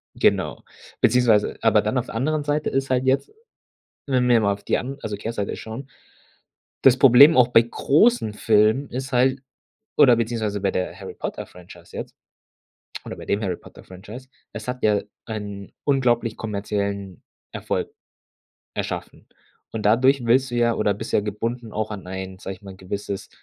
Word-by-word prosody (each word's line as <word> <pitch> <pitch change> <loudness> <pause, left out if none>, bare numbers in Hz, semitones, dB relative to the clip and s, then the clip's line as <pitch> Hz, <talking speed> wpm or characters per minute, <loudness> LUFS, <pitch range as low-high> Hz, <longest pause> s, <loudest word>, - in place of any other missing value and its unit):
Genau. - - +1 0.4
Beziehungsweise 120 -4 +3
aber - - +4
dann - - -1
auf - - 0
der - - -9
anderen 150 +5 0
Seite 145 +1 0
ist 135 0 -1
halt 130 0 +1
jetzt, 135 - +1 0.7
wenn 130 -3 +1
wir 120 -2 +5
mal 100 -1 +2
auf 100 0 -11
die - - +1
an 135 +3 -5
also 105 -1 -4
Kehrseite 105 0 -4
schauen, 120 +5 -8 0.9
das 135 -1 +6
Problem, 140 +5 +8
auch 125 -1 +6
bei 115 -1 +6
großen 145 - +2
Filmen 110 +6 +3
ist 130 +2 -5
halt 130 +2 +2 0.6
oder 135 -5 +7
beziehungsweise 110 -3 -2
bei 95 - +1
der 90 - -3
Harry-Potter-Franchise 90 -1 -9
jetzt - - -7 0.9
oder - - -7
bei - - -10
dem 100 +2 0
Harry-Potter-Franchise: 95 +5 -8 0.2
Es 110 +3 -8
hat 125 - -2
ja 105 -1 +3 0.2
einen 100 -3 -6
unglaublich 120 -5 +1
kommerziellen 100 -3 -4 0.3
Erfolg - - -3 0.8
erschaffen. - - -5 0.4
Und 110 - -4
dadurch 130 +4 +4
willst 130 +3 +3
du 120 - -5
ja 120 -1 +3
oder 105 -1 +1
bist 100 - -7
ja - - +4
gebunden 115 +3 -4
auch 110 0 -2
an 100 -4 -7
ein, 95 0 -6
sage 95 0 -6
ich 95 - -26
mal, 95 -1 -10
gewisses 100 +1 -5
115 Hz, 160 wpm, -23 LUFS, 100-130 Hz, 0.9 s, Problem